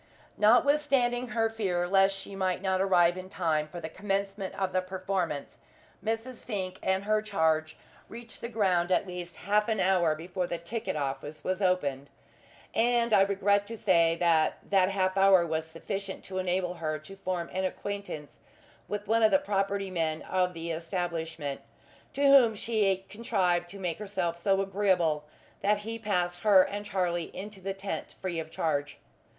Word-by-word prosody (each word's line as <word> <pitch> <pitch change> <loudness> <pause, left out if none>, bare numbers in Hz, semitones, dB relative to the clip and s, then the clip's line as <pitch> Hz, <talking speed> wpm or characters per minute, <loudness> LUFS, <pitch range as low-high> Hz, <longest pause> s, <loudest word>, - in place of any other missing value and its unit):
Notwithstanding 245 +1 +3
her 225 -2 +1
fear 190 -6 -1
lest 195 +1 +4
she 195 0 -7
might 185 -1 -1
not 190 -1 +1
arrive 180 -2 +4
in 185 0 -9
time 155 -5 0
for 175 +3 -8
the 160 - -5
commencement 195 +2 -3
of 190 -2 -2
the 185 - +2
performance, 185 -5 -3 0.4
Mrs. 225 +3 -3
Fink 190 -5 -4
and 190 +1 0
her 215 +1 +2
charge 160 -6 0 0.3
reached 235 0 -11
the 235 - -4
ground 190 -6 +1
at 185 - +3
least 180 -2 -7
half 210 +2 +2
an 220 -2 0
hour 180 -4 +3
before 180 +3 -3
the 170 - -3
ticket 215 +6 -4
office 145 +1 -4
was 185 +2 -2
opened; 145 -8 0 0.6
and 235 0 +2
I 195 - +7
regret 200 +1 +2
to 230 +1 -6
say 170 -5 +3
that 165 -2 +2
that 190 -2 +4
half 190 -1 0
hour 195 -2 +6
was 160 -1 -2
sufficient 195 +4 -5
to 185 -1 -4
enable 180 -1 0
her 155 -3 -3
to 155 +6 -12
form 185 -3 -3
an 190 +1 -1
acquaintance 200 -5 -5 0.5
with 205 0 -4
one 225 +2 +3
of 220 - +6
the 285 - +5
property 200 -6 -1
men 160 -3 -1
of 180 -1 0
the 165 0 -4
establishment, 165 -3 -3 0.5
to 280 - -1
whom 270 -5 +7
she 200 -4 0
contrived 185 -5 0
to 200 - -9
make 180 -3 -3
herself 185 -5 -2
so 195 +2 +2
agreeable 185 -6 +1 0.4
that 210 +1 +3
he 230 +1 -4
passed 180 -5 -1
her 195 -1 +6
and 205 +2 -5
Charlie 175 -4 -1
into 200 0 -7
the 195 +1 -3
tent 195 0 -5
free 175 -3 -3
of 160 -1 -5
charge. 145 -3 -2
190 Hz, 170 wpm, -29 LUFS, 170-205 Hz, 0.6 s, I